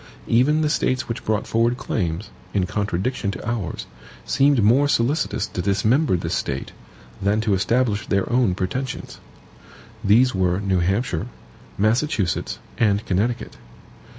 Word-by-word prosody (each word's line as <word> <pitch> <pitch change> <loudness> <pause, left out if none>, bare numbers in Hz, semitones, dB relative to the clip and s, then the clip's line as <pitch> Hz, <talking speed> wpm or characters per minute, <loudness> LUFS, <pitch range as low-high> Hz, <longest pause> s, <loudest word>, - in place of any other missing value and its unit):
Even 140 +7 +3
the 155 - +1
States 130 -3 0
which 115 - -4
brought 110 -1 0
forward 115 +2 +1
claims, 90 -4 -3 0.2
in 95 -3 +2
contradiction 100 +3 -2
to 100 - -5
ours, 115 -7 -3 0.4
seemed 135 -4 +3
more 130 +7 +5
solicitous 120 -5 +1
to 95 - -4
dismember 105 - +2
this - - -3
State, 70 -1 -3 0.5
than 100 +2 +2
to 110 -2 +1
establish 110 +2 +1
their 100 -1 +1
own 120 -7 +2
pretensions. 125 +8 -4 0.8
These 120 +6 +4
were 90 -1 +1
New 95 -2 +1
Hampshire, 95 -1 0 0.5
Massachusetts, 110 - 0 0.2
and 105 -2 +2
Connecticut. 105 +6 -1
110 Hz, 130 wpm, -22 LUFS, 95-125 Hz, 0.8 s, more